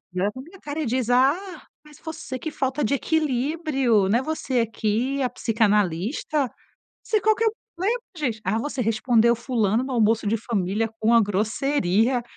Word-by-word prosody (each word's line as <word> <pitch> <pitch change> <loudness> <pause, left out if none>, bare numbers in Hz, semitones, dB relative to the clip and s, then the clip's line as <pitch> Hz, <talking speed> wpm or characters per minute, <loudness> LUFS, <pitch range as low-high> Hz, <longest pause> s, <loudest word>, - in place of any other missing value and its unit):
E 180 - -3
olha 200 +3 +1
pra 260 - -8
minha 350 +6 -15
cara 295 +2 -5
e 300 - -2
diz: 250 0 -1
"Ah, 305 +9 +2 0.2
mas 300 -2 -16
você, 310 -5 -6
que 315 - -5
falta 270 0 -1
de 255 - +1
equilíbrio, 275 - +1
né, 235 +6 +2
você 265 -6 -1
que 230 +5 -1
é 265 - +1
a 250 - 0
psicanalista?". 220 - 0 0.5
Você 430 - +1
qual 435 +2 +3
que 455 - 0
é 445 - +5 0.3
né, 375 +3 0 0.3
gente, 250 -9 -2
"ah, 195 +4 0
você 280 +2 -3
respondeu 230 +1 +3
o - - -8
fulano 230 -2 0
no 265 - -5
almoço 225 -2 +2
de 220 +3 +2
família 215 -1 -1
com 220 +2 +3
a 230 - +7
grosseria". 220 +2 +1
245 Hz, 185 wpm, -24 LUFS, 220-290 Hz, 0.5 s, a